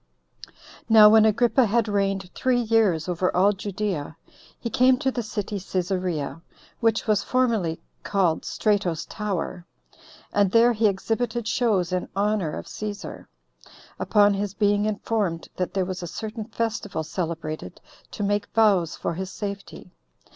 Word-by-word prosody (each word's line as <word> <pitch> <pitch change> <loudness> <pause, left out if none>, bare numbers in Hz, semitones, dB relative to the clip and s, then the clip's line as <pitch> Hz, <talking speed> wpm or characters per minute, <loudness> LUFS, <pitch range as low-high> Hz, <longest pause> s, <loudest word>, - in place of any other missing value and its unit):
2. - - -24 0.4
Now 215 -1 +9
when 220 0 +6
Agrippa 235 +3 +3
had 225 +1 +1
reigned 195 -2 -1
three 250 -1 +1
years 215 -8 +2
over 180 +1 0
all 195 +3 +5
Judea, 195 -6 -4 0.4
he - - -4
came 255 +3 +4
to 265 +1 0
the 245 - -2
city 210 -2 -4
Cæsarea, 180 -4 -2 0.4
which 225 -1 +1
was 210 -2 +2
formerly 225 -10 0 0.2
called 185 -5 +1
Strato's 200 -7 0
Tower; 185 -4 -4 0.7
and 200 -2 +3
there 230 +4 +5
he 220 0 +3
exhibited 225 +3 -1
shows 210 -8 +1
in 185 0 -2
honor 200 -5 0
of - - -7
Cæsar, 210 -1 -7 0.7
upon 205 -1 +4
his 200 0 -3
being 205 -1 +2
informed 205 -5 -1
that 180 +1 -3
there 190 -1 +1
was 185 0 -5
a 175 - -5
certain 215 +5 -6
festival 225 -6 -3
celebrated 160 - -5 0.3
to - - -5
make 205 0 0
vows 195 -7 +3
for - - -3
his 185 +2 -5
safety. 200 -2 -7
205 Hz, 145 wpm, -24 LUFS, 185-220 Hz, 0.7 s, Now